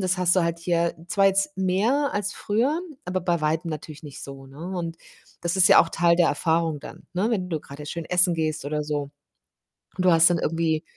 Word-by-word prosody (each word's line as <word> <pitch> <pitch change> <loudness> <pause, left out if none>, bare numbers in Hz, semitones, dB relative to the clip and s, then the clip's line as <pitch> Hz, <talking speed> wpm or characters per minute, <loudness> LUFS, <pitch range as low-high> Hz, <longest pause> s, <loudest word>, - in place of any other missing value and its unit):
das 185 -1 0
hast 180 +1 +3
du 180 - +4
halt 170 0 -2
hier 170 0 0
zwar 195 -2 +3
jetzt 195 +10 +1
mehr 210 +10 +1
als 205 -1 0
früher, 255 +11 0 0.3
aber 185 +1 -2
bei 170 -2 0
Weitem 160 +2 -1
natürlich 155 0 -8
nicht 145 -2 -10
so, 135 -1 -9
ne, 165 +8 -7
und 165 -1 -4 0.4
das 170 +2 -1
ist 190 +2 +6
ja 195 - +8
auch 165 - +1
Teil 170 0 +2
der 175 -1 +4
Erfahrung 160 0 0
dann, - - -12
ne, 205 +6 0
wenn 185 -5 -1
du 160 - -2
grade 145 +1 -11
schön 170 +2 -5
essen 180 0 +3
gehst 155 -2 -2
oder 150 +1 -2
so 145 -2 -3 0.9
und 185 - -1
du 180 - +6
hast 165 0 +6
dann 175 - +1
irgendwie, 160 -1 -1
170 Hz, 220 wpm, -24 LUFS, 160-185 Hz, 0.9 s, ja